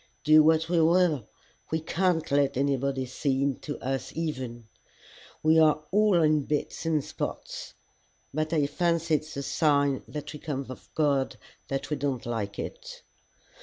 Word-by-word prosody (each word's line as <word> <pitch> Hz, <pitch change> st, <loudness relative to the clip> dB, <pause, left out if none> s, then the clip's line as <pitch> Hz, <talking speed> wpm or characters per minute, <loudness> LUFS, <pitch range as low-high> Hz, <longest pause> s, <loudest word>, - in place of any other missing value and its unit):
Do 155 Hz, 0 st, +7 dB
what 160 Hz, +1 st, +4 dB
we 170 Hz, -1 st, +2 dB
will, 160 Hz, -, +3 dB, 0.4 s
we 160 Hz, -, 0 dB
can't 165 Hz, 0 st, 0 dB
let 140 Hz, -1 st, +2 dB
anybody 135 Hz, -1 st, 0 dB
see 135 Hz, +1 st, -1 dB
into 140 Hz, +1 st, -2 dB
us 135 Hz, 0 st, -2 dB
even. 130 Hz, -8 st, -4 dB, 0.8 s
We 160 Hz, +1 st, +5 dB
are 155 Hz, -1 st, +4 dB
all 205 Hz, -4 st, +4 dB
in 155 Hz, -2 st, +3 dB
bits 150 Hz, +2 st, -2 dB
and 155 Hz, -3 st, +1 dB
spots. -, -, -6 dB, 0.6 s
But 155 Hz, +1 st, -1 dB
I 155 Hz, -3 st, +2 dB
fancy 165 Hz, +2 st, 0 dB
it's 155 Hz, 0 st, -1 dB
a 140 Hz, -, -2 dB
sign 140 Hz, -3 st, +2 dB
that 150 Hz, 0 st, -6 dB
we 150 Hz, -, -8 dB
come 140 Hz, -3 st, -4 dB
of 130 Hz, -, -10 dB
God 140 Hz, -4 st, +1 dB, 0.3 s
that 135 Hz, +2 st, -3 dB
we 150 Hz, -, 0 dB
don't 135 Hz, -3 st, -2 dB
like 105 Hz, -4 st, -3 dB
it. -, -, -7 dB
150 Hz, 155 wpm, -27 LUFS, 135-160 Hz, 0.8 s, Do